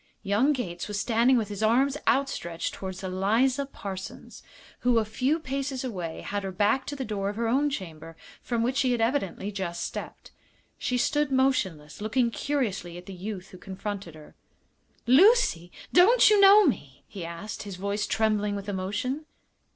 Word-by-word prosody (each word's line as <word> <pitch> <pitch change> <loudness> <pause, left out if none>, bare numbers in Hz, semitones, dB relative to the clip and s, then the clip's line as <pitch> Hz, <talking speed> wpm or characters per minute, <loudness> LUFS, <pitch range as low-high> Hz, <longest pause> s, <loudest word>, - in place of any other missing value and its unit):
Young 215 +8 +2
Gates 175 -11 -3
was 205 -1 -3
standing 235 +4 +3
with 215 -3 -1
his 205 0 -6
arms 255 +6 +3
outstretched 175 -12 0
toward 190 0 -7
Eliza 225 +9 +1
Parsons, 195 -7 -8 0.4
who, 245 -1 +2
a 220 - +2
few 255 +8 0
paces 270 -2 -3
away, 180 -10 -5
had 205 0 -3
her 195 - -3
back 210 +7 +1
to 290 - -4
the 265 -2 -4
door 200 -2 -2
of 205 - -5
her 230 +1 -1
own 275 +5 +2
chamber, 165 - -7 0.2
from 235 -2 -1
which 255 +3 0
she 260 -3 +2
had 240 - -1
evidently 225 -4 -1
just 175 -4 -4
stepped. - - -7 0.5
She 250 - -1
stood 295 +3 +1
motionless, 195 - 0
looking 235 +3 +1
curiously 215 -12 -2
at 180 - -11
the 195 - -8
youth 190 0 -6
who 185 - -13
confronted 195 -3 -6
her. 155 -1 -14 0.7
"Lucy! 265 - +5 0.2
don't 430 +6 +6
you 415 -1 +5
know 400 +1 +8
me?" 145 - -2
he 195 -4 -8
asked, 170 +6 -6
his 200 -3 -7
voice 200 +2 -2
trembling 210 -2 +1
with 200 0 -6
emotion. 205 +10 -3
215 Hz, 170 wpm, -27 LUFS, 190-265 Hz, 0.7 s, know